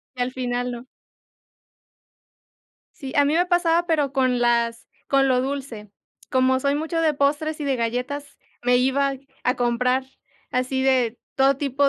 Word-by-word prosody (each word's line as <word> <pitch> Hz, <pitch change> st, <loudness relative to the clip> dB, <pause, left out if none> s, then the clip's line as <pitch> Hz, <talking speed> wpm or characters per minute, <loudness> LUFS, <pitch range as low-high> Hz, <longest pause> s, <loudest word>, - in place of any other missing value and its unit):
Y 250 Hz, -, -8 dB
al 250 Hz, +1 st, -2 dB
final 245 Hz, -1 st, -2 dB
no. 240 Hz, +1 st, -7 dB, 2.1 s
Sí, 270 Hz, -3 st, -8 dB
a 285 Hz, -, +5 dB
mí 290 Hz, -, +1 dB
me 350 Hz, +2 st, +3 dB
pasaba, 345 Hz, -1 st, +2 dB
pero 295 Hz, -5 st, +1 dB
con 255 Hz, -3 st, +2 dB
las 235 Hz, -1 st, +1 dB, 0.2 s
con 275 Hz, -1 st, +3 dB
lo 255 Hz, -1 st, +3 dB
dulce. 260 Hz, -6 st, -5 dB, 0.4 s
Como 260 Hz, 0 st, +3 dB
soy 280 Hz, +1 st, +1 dB
mucho 320 Hz, +2 st, -1 dB
de 315 Hz, -2 st, +2 dB
postres 295 Hz, +2 st, 0 dB
y -, -, -2 dB
de 275 Hz, -2 st, 0 dB
galletas, 250 Hz, +5 st, -3 dB, 0.2 s
me 245 Hz, 0 st, +3 dB
iba 275 Hz, +2 st, +2 dB, 0.3 s
a 250 Hz, +1 st, +1 dB
comprar 250 Hz, +2 st, +1 dB, 0.5 s
así 255 Hz, +1 st, -1 dB
de 255 Hz, -3 st, +2 dB, 0.2 s
todo 270 Hz, 0 st, +3 dB
tipo 280 Hz, 0 st, +1 dB
265 Hz, 155 wpm, -23 LUFS, 250-285 Hz, 2.1 s, a